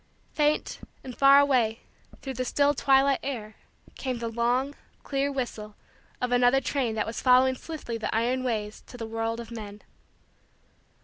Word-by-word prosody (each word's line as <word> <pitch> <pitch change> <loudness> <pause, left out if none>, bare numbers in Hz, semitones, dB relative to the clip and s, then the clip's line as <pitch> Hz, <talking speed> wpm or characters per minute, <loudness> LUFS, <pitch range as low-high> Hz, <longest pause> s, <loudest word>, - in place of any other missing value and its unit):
Faint 300 -1 0 0.2
and 255 -2 -8
far 275 0 +7
away, 250 -5 +2 0.4
through 270 - -4
the 255 0 -2
still 285 +3 +2
twilight 270 0 +3
air, 225 -6 -5 0.4
came 255 -2 -4
the 230 0 -4
long, 245 +4 0 0.3
clear, 280 0 -1
whistle 220 -6 -5 0.4
of 250 0 -2
another 245 +2 +4
train 255 -4 -1
that 215 - 0
was 225 0 -5
following 255 0 +5
swiftly 260 -4 -6
the 220 - -3
iron 245 +3 0
ways 215 -4 -3
to 245 - -11
the 230 - -5
world 225 +1 -3
of 235 0 -8
men. 210 -3 -8
250 Hz, 160 wpm, -27 LUFS, 225-270 Hz, 0.4 s, far